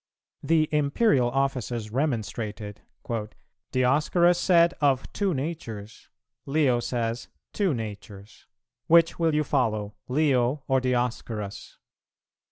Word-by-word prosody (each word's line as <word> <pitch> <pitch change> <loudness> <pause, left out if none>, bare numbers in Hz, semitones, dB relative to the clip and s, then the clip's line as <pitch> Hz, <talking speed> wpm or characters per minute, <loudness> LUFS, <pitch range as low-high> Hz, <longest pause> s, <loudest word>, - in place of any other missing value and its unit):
The 155 -1 +2
Imperial 145 - +2
officers 125 -4 -2
remonstrated, 110 -5 -3 0.9
"Dioscorus 155 +7 +3
said, 170 -2 +4
'Of 135 -3 +1
two 195 -4 0
natures;' 120 -8 -6 0.4
Leo 135 -4 +2
says, 115 -1 -3 0.3
'Two 190 -8 +1
natures:' 105 -2 -9 0.4
which 165 +1 +4
will 165 -2 +2
you 150 - +2
follow, 110 -8 -1
Leo 135 -1 +1
or 135 -1 +2
Dioscorus?" 120 -5 -3
130 Hz, 95 wpm, -26 LUFS, 115-155 Hz, 0.9 s, said